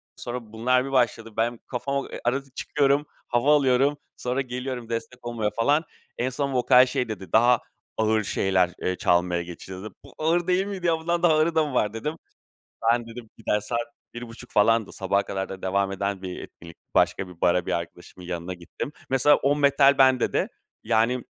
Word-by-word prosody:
Sonra 120 -3 -7
bunlar 125 +3 +2
bir 135 - -6
başladı. 120 -3 +1
Ben 115 +1 0
kafama 140 +2 -2 0.2
Arada 135 +3 0
çıkıyorum, 145 0 +1 0.2
hava 130 +5 +3
alıyorum. 140 +1 +3 0.2
Sonra 125 +2 -1
geliyorum, 125 -2 -5
destek 120 +2 -5
olmaya 115 -3 -1
falan. 145 +7 +3 0.3
En 125 +2 0
son 140 +1 -2
vokal 125 0 +6
şey 125 -2 -2
dedi: 95 -5 -7
Daha 120 +1 +5 0.4
ağır 110 0 +2
şeyler, 95 -2 +1
eee, 90 - 0
çalmaya 90 0 +2
geçiyoruz, 95 +3 -9
dedi. 110 - -8
"Bu - - -15
ağır 165 +3 +1
değil 185 +2 +2
miydi 190 -4 -3
ya, 165 - +3
bundan 170 +1 -1
daha 165 - +6
ağırı 155 +2 +2
da 160 -1 +4
mı 145 - -5
var?" 105 -3 +1
dedim. 150 +8 -3 0.8
Ben 120 0 +1
dedim 115 0 -10
gider, 105 -2 0
saat 115 +3 -2 0.4
bir 120 0 -7
buçuk 120 +2 -12
falandı. 110 0 +3
Sabaha 100 +1 0
kadar 95 -1 -4
da 95 -1 -8
devam 95 +1 0
eden 100 0 -3
bir 90 -1 -5
etkinlik. 85 -1 -12 0.2
Başka 95 - +2
bir 90 -2 -14
bara, 90 0 +2
bir - - -1
arkadaşımın 90 +1 -6
yanına 90 +1 -4
gittim. 90 - -7 0.2
Mesela, 135 +3 +5
o 140 +2 +1
metal 140 -1 +4
bende 130 -2 +4
de - - +1 0.4
yani 115 +2 +1
120 Hz, 185 wpm, -25 LUFS, 100-135 Hz, 0.8 s, vokal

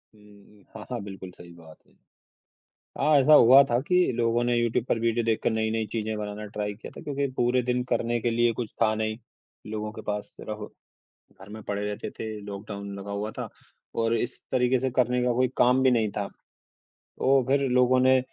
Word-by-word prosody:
हुँ, 105 - -21
हुँ। 105 -1 -20
हाँ, 110 - -8
हाँ 120 - -2
बिल्कुल 95 -2 -9
सही 90 -1 -14
बात 80 -2 -15
है। - - -28 1.1
हाँ, 155 - +3
ऐसा 145 +4 +4
हुआ 130 +1 +8
था 120 - +3
कि 180 - +3 0.2
लोगों 120 0 +1
ने 120 0 +1
यूट्यूब 120 0 +1
पर - - +1
वीडियो 115 0 +1
देखकर 115 +1 +1
नई-नई 110 0 -1
चीज़ें 110 -1 -2
बनाना 105 0 -5
ट्राई 105 0 -4
किया 110 - -10
था - - -7
क्योंकि 140 -2 -1
पूरे 125 +1 +2
दिन 125 +1 0
करने 120 -1 0
के 120 - 0
लिए 120 0 +2
कुछ 115 0 -4
था 110 - +3
नहीं, 110 0 -2 0.5
लोगों 110 0 -4
के - - -9
पास 105 0 -3
सिर्फ 105 -1 -6 0.8
घर 95 - -12
में 110 +1 -9
पड़े 100 0 -3
रहते 105 0 -5
थे। 110 -1 -5
लॉकडाउन 100 0 -7
लगा 100 +1 -7
हुआ 105 +2 -3
था - - -4 0.5
और 115 +1 +2
इस 120 +3 -3
तरीके 125 0 +3
से 130 +1 0
करने 125 0 +1
का 125 - +2
कोई 125 +2 +2
काम 125 +2 +4
भी 130 - +5
नहीं 115 -4 +2
था। 100 - -1 0.7
तो 135 0 +1
फिर 140 0 +2
लोगों 125 0 +4
ने 130 0 +5
115 Hz, 205 wpm, -26 LUFS, 105-125 Hz, 1.1 s, हुआ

